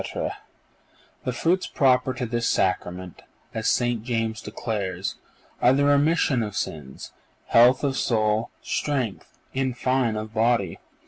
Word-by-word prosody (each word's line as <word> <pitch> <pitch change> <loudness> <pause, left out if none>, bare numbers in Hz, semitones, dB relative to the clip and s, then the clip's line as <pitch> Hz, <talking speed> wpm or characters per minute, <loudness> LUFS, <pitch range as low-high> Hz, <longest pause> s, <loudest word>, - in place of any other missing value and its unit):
_ - - -3 0.9
The 125 - 0
fruits 170 +9 +1
proper 130 -1 +2
to 125 - -2
this 120 0 -1
Sacrament, 90 -1 -1 0.3
as 110 -1 -2
St. 120 -3 +1
James 115 -2 -2
declares, 100 -4 -3 0.4
are 125 - +6
the 140 +1 +3
remission 145 -2 +3
of 105 -2 -4
sins, 70 -8 -5 0.4
health 125 +4 +6
of 140 -2 +1
soul, 110 -3 +1
strength—in 130 0 -3
fine, 130 -2 +1
of 110 0 -5
body. 110 -5 +1
120 Hz, 125 wpm, -25 LUFS, 110-130 Hz, 0.9 s, are